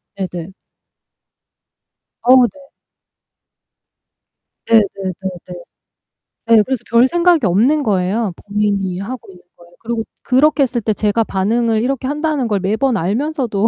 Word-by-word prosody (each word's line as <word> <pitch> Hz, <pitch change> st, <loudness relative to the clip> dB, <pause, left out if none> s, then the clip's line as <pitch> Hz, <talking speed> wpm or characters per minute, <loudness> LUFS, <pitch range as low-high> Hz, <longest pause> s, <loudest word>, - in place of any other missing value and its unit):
네네. 185 Hz, -2 st, -6 dB, 1.7 s
어우 250 Hz, 0 st, +6 dB
네. 285 Hz, -, -17 dB, 2.1 s
네 230 Hz, -, +4 dB
네 195 Hz, -2 st, -2 dB
네 190 Hz, -1 st, -3 dB, 0.2 s
네. 180 Hz, -, -7 dB, 1.0 s
네 215 Hz, -, +6 dB
그래서 260 Hz, -3 st, -3 dB
별 235 Hz, +2 st, +5 dB
생각이 345 Hz, -3 st, +2 dB
없는 240 Hz, -, +2 dB
거예요, 200 Hz, 0 st, 0 dB
본인이 200 Hz, -3 st, -2 dB
하고 225 Hz, +1 st, -7 dB
있는 180 Hz, -1 st, -18 dB
거에. 175 Hz, -, -18 dB
그리고 230 Hz, 0 st, -3 dB, 0.2 s
그렇게 285 Hz, +3 st, +3 dB
했을 240 Hz, -2 st, -1 dB
때 215 Hz, 0 st, 0 dB
제가 210 Hz, +2 st, 0 dB
반응을 220 Hz, +3 st, 0 dB
이렇게 260 Hz, +1 st, -2 dB
한다는 295 Hz, -2 st, -1 dB
걸 205 Hz, -3 st, 0 dB
매번 220 Hz, +7 st, 0 dB
알면서도 225 Hz, -, -1 dB
225 Hz, 255 characters per minute, -17 LUFS, 195-260 Hz, 2.1 s, 어우